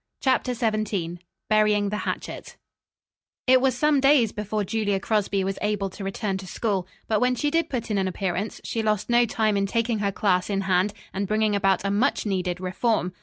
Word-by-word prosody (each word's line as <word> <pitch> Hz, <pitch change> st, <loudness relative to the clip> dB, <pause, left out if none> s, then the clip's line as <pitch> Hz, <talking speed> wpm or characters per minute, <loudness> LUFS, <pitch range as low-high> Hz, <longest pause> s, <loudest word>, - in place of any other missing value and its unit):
CHAPTER 255 Hz, -2 st, +1 dB
XVII 215 Hz, -7 st, -1 dB, 0.3 s
BURYING 210 Hz, -1 st, +3 dB
THE 210 Hz, +1 st, -3 dB
HATCHET -, -, -6 dB, 0.9 s
It 255 Hz, 0 st, +5 dB
was 260 Hz, -2 st, +2 dB
some 300 Hz, +1 st, +3 dB
days 270 Hz, -5 st, +4 dB
before 210 Hz, 0 st, -2 dB
Julia 205 Hz, -1 st, 0 dB
Crosby 200 Hz, -1 st, 0 dB
was 195 Hz, 0 st, -3 dB
able 205 Hz, -2 st, -1 dB
to 195 Hz, -, -8 dB
return 195 Hz, 0 st, -2 dB
to 190 Hz, -, -9 dB
school, 195 Hz, -2 st, -2 dB, 0.2 s
but 215 Hz, -2 st, +2 dB
when 250 Hz, 0 st, +3 dB
she 290 Hz, +4 st, 0 dB
did 330 Hz, 0 st, +1 dB
put 235 Hz, -4 st, -3 dB
in 205 Hz, -, +1 dB
an 190 Hz, -, 0 dB
appearance, 190 Hz, +2 st, -3 dB
she 225 Hz, -, -2 dB
lost 215 Hz, +1 st, 0 dB
no 240 Hz, 0 st, +4 dB
time 215 Hz, -1 st, +1 dB
in 200 Hz, 0 st, +1 dB
taking 230 Hz, +1 st, 0 dB
her 200 Hz, -1 st, 0 dB
class 185 Hz, -2 st, +1 dB
in 195 Hz, -1 st, 0 dB
hand 190 Hz, +1 st, +1 dB, 0.2 s
and 195 Hz, +1 st, -2 dB
bringing 215 Hz, 0 st, +1 dB
about 195 Hz, -1 st, +2 dB
a 200 Hz, -, +1 dB
much 230 Hz, +7 st, +1 dB
needed 185 Hz, -3 st, -1 dB
reform. 185 Hz, 0 st, 0 dB
210 Hz, 195 wpm, -25 LUFS, 195-230 Hz, 0.9 s, It